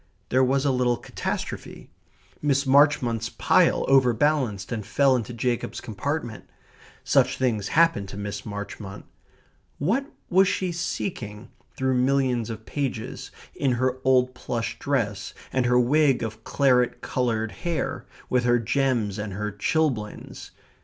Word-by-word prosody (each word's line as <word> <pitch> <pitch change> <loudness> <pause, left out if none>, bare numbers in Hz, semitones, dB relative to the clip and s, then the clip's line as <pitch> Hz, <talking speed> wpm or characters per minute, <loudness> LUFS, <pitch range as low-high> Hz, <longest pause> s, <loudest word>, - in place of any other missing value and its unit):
There 130 +1 +3
was 135 +2 +2
a 140 - +3
little 125 -2 +1
catastrophe. - - -5 0.5
Miss 140 -1 +1
Marchmont's 130 -5 +3
pile - - +3
overbalanced 125 -5 +2
and 110 -3 -2
fell 135 +6 +3
into 120 -2 -3
Jacob's 120 0 -2
compartment. 120 +1 -4 0.5
Such - - +3
things 115 -6 0
happened 165 -13 +3
to 100 - -8
Miss 100 0 -5
Marchmont. 100 -1 -7 0.7
What 230 - 0 0.2
was 190 +2 +4
she 185 -1 -1
seeking 120 - -4 0.3
through 130 0 +1
millions 130 -3 +1
of 110 -1 -7
pages, 130 -5 -4 0.2
in 135 -3 0
her 130 +1 0
old 130 -1 +3
plush 115 -2 -4
dress, 105 -8 -2 0.2
and 130 -2 +2
her 125 0 +4
wig 135 0 +3
of 110 0 -6
claret 125 -3 +2
coloured 115 -3 -1
hair, 165 - -3 0.2
with 125 -1 +1
her 120 0 +4
gems 115 -3 0
and 105 -2 -4
her 105 +2 -3
chilblains? 110 0 -2
125 Hz, 130 wpm, -25 LUFS, 110-140 Hz, 0.7 s, was